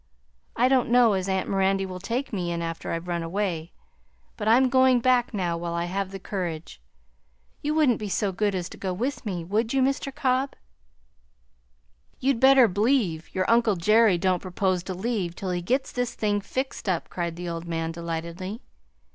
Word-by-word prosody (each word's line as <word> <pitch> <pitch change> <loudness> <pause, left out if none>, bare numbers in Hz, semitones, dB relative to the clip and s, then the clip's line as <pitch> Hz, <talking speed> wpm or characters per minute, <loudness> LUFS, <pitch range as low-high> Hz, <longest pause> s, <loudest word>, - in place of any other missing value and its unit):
I 245 +2 +4
don't 255 -2 +2
know 240 -2 +5
as 190 0 -1
aunt 190 -1 0
Mirandy 195 0 +1
will 185 -1 -6
take 235 +7 -3
me 175 -3 -2
in 170 0 -2
after 165 0 -4
I've 165 +1 -4
run 170 -1 -1
away, 170 -1 -2 0.6
but 215 - -4
I'm 250 +4 +5
going 260 -1 +4
back 250 0 +2
now 180 -6 -1
while 170 0 -3
I 170 0 -1
have 190 +2 -2
the 195 - -7
courage. 175 - -5 0.8
You 300 +1 -1
wouldn't 290 -7 +3
be 210 -2 -4
so 195 +1 0
good 200 +1 0
as 180 -1 -2
to - - -11
go 190 -2 -3
with 240 +4 -3
me, 180 -4 -3
would 220 +8 -1
you, 265 - +3
Mr. 275 +1 0
Cobb?" 265 -1 0 1.6
"You'd 265 -2 +1
better 265 -1 +7
b'lieve 200 - +1
your 185 0 0
uncle 230 -3 +3
Jerry 215 +2 +4
don't 185 0 +1
propose 185 0 0
to 185 - -4
leave 190 -4 -2
till 185 -1 -4
he 175 0 -1
gits 260 +10 0
this 245 -1 -2
thing 205 -1 0
fixed 260 0 -4
up," 175 -3 -1
cried 170 -2 -3
the 175 +1 -6
old 170 0 -5
man 165 -1 -2
delightedly. 170 +5 -5
195 Hz, 190 wpm, -26 LUFS, 175-240 Hz, 1.6 s, better